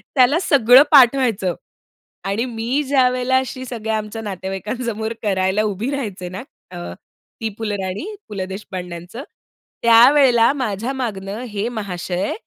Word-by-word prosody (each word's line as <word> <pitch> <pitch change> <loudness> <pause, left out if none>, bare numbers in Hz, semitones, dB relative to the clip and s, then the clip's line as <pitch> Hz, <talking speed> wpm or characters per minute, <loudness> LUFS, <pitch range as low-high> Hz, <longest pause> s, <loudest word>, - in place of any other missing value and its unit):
त्याला 265 +5 +4
सगळं 260 -3 +6
पाठ 270 -3 +7
व्हायचं 215 -9 0 0.7
आणि 200 +5 -1
मी 240 +4 -2
ज्यावेळेला 255 -1 +2
अशी 260 0 -5
सगळ्या 220 -3 -3
आमच्या 215 +1 -6
नातेवाईकांसमोर 210 +4 -4
करायला 190 0 +1
उभी 210 +5 -2
राहायचे 205 -10 -4
ना, 185 +5 -7 0.3
अ, 175 - -7 0.6
ती 225 - -1
फुलराणी, 205 - -4
पु. 210 - -8
ल. 190 -1 -3
देशपांड्यांचं. 185 +2 -7 0.6
त्यावेळेला 240 +1 +6
माझ्या 245 -2 -3
मागून 215 -7 -4
हे 215 0 -4
महाशय 190 -4 -3
225 Hz, 125 wpm, -20 LUFS, 195-255 Hz, 0.7 s, पाठ